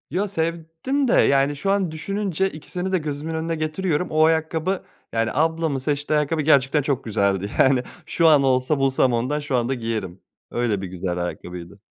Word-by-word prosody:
Ya 190 +7 -1
sevdim 165 - -2
de - - +2
yani 140 +1 +3
şu 195 +8 -1
an 195 -4 +1
düşününce 195 +2 -1
ikisini 180 +4 -5
de 185 - +3
gözümün 150 0 -4
önüne 165 +1 -2
getiriyorum, 155 +2 -1
o 155 0 +4
ayakkabı 160 +3 0 0.3
yani, 115 0 +1
ablamın 160 0 +1
seçtiği 145 +2 -1
ayakkabı, 155 +2 0
gerçekten 145 -1 +3
çok 135 -2 -1
güzeldi. 100 -3 0
Yani 130 -1 +4 0.2
şu 165 - +2
an 150 -3 +6
olsa 130 +2 +2
bulsam 135 -2 +2
ondan 125 +6 0
şu 145 -3 -2
anda 120 +2 +1
giyerim. 110 -7 -4 0.3
Öyle 115 -5 0
bir 95 - -4
güzel 90 0 -4
ayakkabıydı. 90 +2 -8
150 Hz, 170 wpm, -23 LUFS, 125-165 Hz, 0.3 s, an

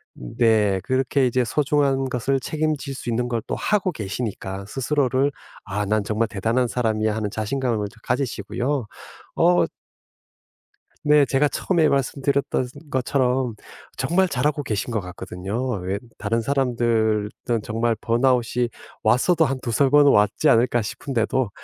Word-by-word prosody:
네. 105 - +2
그렇게 130 +1 +1
이제 125 0 +2
소중한 140 0 +1
것을 130 +2 0
책임질 150 0 -2
수 125 -2 -6
있는 120 +1 0
걸 120 -2 -1
또 - - -2
하고 200 -3 0
계시니까 100 - -5
스스로를 135 +2 +1 0.3
'아 105 0 -2
난 105 +1 +1
정말 110 +2 0
대단한 115 +4 0
사람이야.' 110 -3 0
하는 105 -2 -2
자신감을 110 -1 -1
좀 115 - -20
가지시고요. 125 +1 -2 0.5
어 175 +1 +4 1.4
네 150 -1 +5
제가 135 +3 +2
처음에 165 +1 +1
말씀드렸던 140 -1 0 0.2
것처럼 130 -3 0 0.4
정말 185 +2 +2
잘하고 145 +1 0
계신 110 0 -3
것 110 - 0
같거든요. 95 +6 -4
왜 95 +2 -2 0.2
다른 115 +2 -1
사람들은 115 -5 +1 0.4
정말 115 +1 0
번아웃이 120 0 +1 0.3
왔어도 160 +9 +3
한 135 -2 -1
2-3 120 +4 +1
번은 145 0 +6
왔지 105 -1 +3
않을까 120 +1 +4
싶은데도 120 +1 -1
125 Hz, 295 characters per minute, -23 LUFS, 110-140 Hz, 1.4 s, 번은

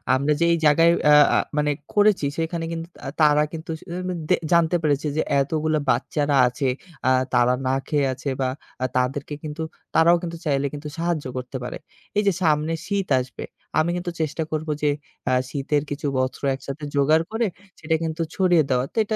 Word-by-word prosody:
আমরা 140 +3 +2
যে - - +3
এই 170 - +2
জায়গায় 165 +3 +6 0.2
আ - - +8 0.2
আ - - +4 0.2
মানে 150 0 +2 0.2
করেছি 205 -6 +4
সেখানে 165 0 -2
কিন্তু 165 0 -4 0.2
আ - - -3
তারা 150 0 +5
কিন্তু 165 0 -8
আসলে 170 +2 -10
উ 185 - -5
মেন 180 -2 -3
দে - - +6 0.2
জানতে 170 0 +4
পেরেছে 145 0 +1
যে - - +3 0.2
এতগুলা 155 +2 0
বাচ্চারা 145 +3 +1
আছে, 130 +2 -2 0.4
আ - - +5 0.2
তারা 125 0 +4
না 130 - +1
খেয়ে 145 -2 +1
আছে 140 - -5
বা 130 - +2 0.4
আ - - +3
তাদেরকে 135 +4 -1
কিন্তু 155 +1 -5 0.3
তারাও 170 +2 +5
কিন্তু 170 -1 -4
চাইলে 140 -2 +1
কিন্তু 145 +1 -6
সাহায্য 170 -3 -1
করতে 125 +1 -5
পারে। 125 - -5 0.4
এই 210 - +3
যে - - +6
সামনে 155 0 +2
শীত 200 -2 -1
আসবে, 125 -1 -6 0.4
আমি 155 +2 +2
কিন্তু 175 0 -3
চেষ্টা 160 +1 -1
করবো 155 0 -2
যে 150 - +4 0.4
আ - - +2 0.2
শীতের 145 +1 -1
কিছু 145 +1 -5
বস্ত্র 130 +2 -2
একসাথে 140 +2 -8
জোগাড় 155 +3 +4
করে 225 +1 0 0.3
সেটা 160 +1 0
কিন্তু 160 0 -3
ছড়িয়ে 180 -4 +4
দেওয়া। 125 -1 +2
তো - - -14
এটা 220 +1 -2
155 Hz, 195 wpm, -23 LUFS, 140-165 Hz, 0.4 s, আ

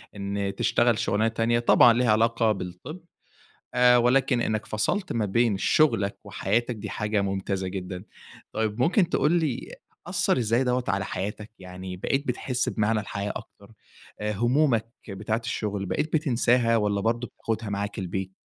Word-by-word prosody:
إن 100 0 -3
تشتغل 120 -2 +2
شُغلانة 110 -1 +1
تانية 115 +1 +1
طبعًا 120 0 +6
ليها 120 -1 +2
علاقة 115 +1 +3
بالطِب، 95 - -6 0.8
آآ 125 0 +6
ولكن 125 +1 +3
إنّك 110 -1 -1
فصَلت 185 - -1
ما 115 -2 0
بين 115 +1 +2
شُغلك 100 -7 +2
وحياتك، 120 +5 -1
دي 105 - -7
حاجة 105 -1 -1
ممتازة 95 -1 -2
جدًا. 90 0 -6 0.5
طيب 110 +1 -2
ممكن 175 - +3
تقول 150 - +2
لي 160 -8 -1 0.3
أثّر - - +1
إزاي 115 +2 +1
دوّة 125 0 0
على 95 +1 0
حياتك؟ 105 +3 -5
يعني 90 0 -8
بقيت 135 +10 -1
بتحِس 125 0 -1
بمعنى 110 0 +1
الحياة 100 0 -4
أكتر؟ 100 +2 -11 0.5
آآ 105 0 -1
هُمومك 120 +1 +2 0.2
بتاعة 105 +3 -2
الشُغل، 105 -3 -3
بقيت 150 - -2
بتنساها 125 -5 +2
والّا 105 -2 +1
برضه 115 +3 0
بتاخُدها 110 -1 -4
معاك 100 0 -3
البيت؟ 95 0 -4
110 Hz, 150 wpm, -26 LUFS, 100-120 Hz, 0.8 s, طبعًا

